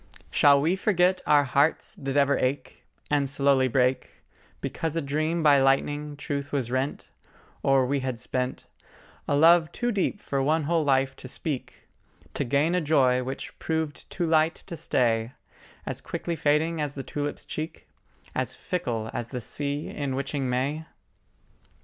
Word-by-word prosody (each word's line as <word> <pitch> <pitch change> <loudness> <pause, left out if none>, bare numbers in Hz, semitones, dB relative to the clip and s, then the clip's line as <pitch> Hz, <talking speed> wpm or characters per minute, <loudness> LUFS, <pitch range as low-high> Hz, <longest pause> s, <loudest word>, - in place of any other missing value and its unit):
Shall 140 -1 +6
we 160 +6 +2
forget 185 -2 +2
our 145 -1 +5
hearts 140 +3 +1
did 135 0 -3
ever 140 0 +4
ache 135 +3 -3 0.2
And 140 -2 +2
slowly 140 -1 +3
break, 125 +1 0 0.4
Because 165 -1 -3
a - - +1
dream 155 +4 -1
by 145 -3 +6
lightning 145 +2 +1
truth 140 -1 -4
was 130 -4 -1
rent, 130 +2 -2 0.5
Or 135 -1 +3
we 140 +2 0
had 130 -2 -3
spent 125 +2 -3 0.6
A 145 - +2
love 165 +2 +5
too 240 0 -1
deep 205 -1 -1
for 140 -7 -2
one 155 +3 +2
whole 165 +2 +1
life 135 -1 +2
to - - -9
speak 140 0 -5 0.5
To - - 0
gain 140 +6 +1
a 180 - +2
joy 135 -5 +3
which 130 +2 -6
proved 160 -2 -3
too 175 - -2
light 160 0 +2
to 170 - -6
stay, 115 -5 0 0.5
As - - -5
quickly 170 - -4
fading 155 +2 +1
as 145 -1 -3
the 135 - -5
tulip's 145 +1 -4
cheek, 155 +1 -6 0.5
As - - -2
fickle 120 -12 -3
as 120 -1 -4
the 125 - -4
sea 145 +5 -4
in 140 -3 -3
witching 140 -1 -2
May? 140 +6 -1
145 Hz, 160 wpm, -26 LUFS, 135-160 Hz, 0.6 s, Shall